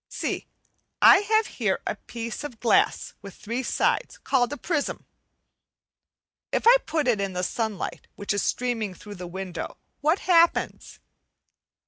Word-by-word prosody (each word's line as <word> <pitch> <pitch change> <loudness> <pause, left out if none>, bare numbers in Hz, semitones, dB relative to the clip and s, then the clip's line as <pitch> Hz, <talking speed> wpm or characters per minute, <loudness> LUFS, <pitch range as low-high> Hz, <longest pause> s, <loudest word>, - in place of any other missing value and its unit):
See, - - -3 0.5
I - - +8
have 435 +2 +2
here - - -1
a - - -1
piece 230 +2 -6
of 260 -6 -7
glass 230 - +2
with 200 -2 -10
three 230 +5 -4
sides, - - 0
called 250 -2 +1
a 290 - -4
prism. 315 -3 -2 1.5
If - - 0
I 475 +2 +9
put 310 -3 0
it 225 -5 +2
in 195 -1 -2
the 180 0 -2
sunlight 220 0 -3
which 205 - -2
is 205 - 0
streaming 230 -6 -1
through 205 +4 -10
the 180 - -5
window, 185 0 -6 0.2
what 310 +5 +2
happens? 340 -2 +2
240 Hz, 145 wpm, -25 LUFS, 205-305 Hz, 1.5 s, I